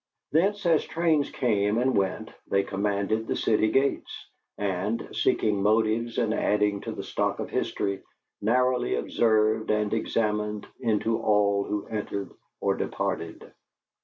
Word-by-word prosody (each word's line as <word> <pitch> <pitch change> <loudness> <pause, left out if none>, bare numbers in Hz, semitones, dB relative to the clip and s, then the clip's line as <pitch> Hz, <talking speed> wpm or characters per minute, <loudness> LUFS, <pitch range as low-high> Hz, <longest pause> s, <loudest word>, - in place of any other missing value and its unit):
Thence, 195 +6 +2
as 165 -3 +4
trains 160 -3 +1
came 105 -3 +1
and 130 +2 +2
went, 95 -1 -1 0.2
they 100 0 +2
commanded 100 +3 -1
the - - -1
city 110 0 +2
gates, 135 +3 -1 0.3
and, 100 +3 -2
seeking 105 -2 +1
motives 110 +2 +1
and 115 -3 +1
adding 105 -2 +1
to - - -5
the - - -6
stock - - -1
of - - -5
history, 100 -1 -1 0.4
narrowly 125 - +2
observed 110 - +2
and 105 -1 +1
examined 105 -1 -1
into 115 -1 0
all 100 -2 +2
who 105 0 -3
entered 100 -2 -4 0.3
or - - +2
departed. 85 0 -4
110 Hz, 135 wpm, -27 LUFS, 100-115 Hz, 0.4 s, as